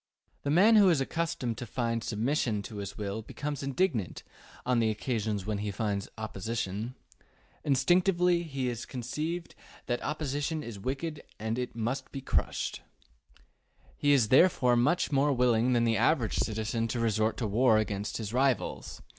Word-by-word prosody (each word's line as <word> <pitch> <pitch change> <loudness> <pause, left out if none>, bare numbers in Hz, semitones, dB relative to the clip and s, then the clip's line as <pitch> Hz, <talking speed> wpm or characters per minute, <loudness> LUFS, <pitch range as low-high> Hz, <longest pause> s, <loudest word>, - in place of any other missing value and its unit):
The 140 - -3
man 200 +9 +6
who 200 -3 +7
is 165 -5 +3
accustomed 135 -5 -2
to 125 - -6
find 115 -2 -1
submission 115 -2 0
to 105 - -8
his 100 -1 -6
will 105 +1 -3
becomes 145 +6 -5
indignant 135 - -1 0.4
on 125 -1 +2
the 115 -1 +2
occasions 110 -3 -2
when 105 -1 -2
he 105 0 -2
finds 100 -1 -2
opposition. 110 +1 -4 0.7
Instinctively 175 +5 +3
he 135 -6 -3
is 120 -1 -4
convinced 155 +8 -4 0.3
that 120 - -1
opposition 150 +1 -2
is 110 -4 -7
wicked 140 +8 -3 0.2
and 115 +3 -2
must 120 +4 -3
be 135 - -5
crushed. 135 - -1 1.1
He 145 - +2
is 125 -7 +4
therefore 130 -4 +5
much 145 +10 +2
more 140 +1 +3
willing 125 -1 +3
than 120 -1 +3
the 115 -1 +2
average 125 -9 +2
citizen 110 +1 -1
to 120 +1 -2
resort 110 -1 +1
to 120 - -2
war 110 +2 +4
against 105 -1 -2
his 110 -1 -5
rivals. 130 0 0
120 Hz, 155 wpm, -30 LUFS, 110-145 Hz, 1.1 s, who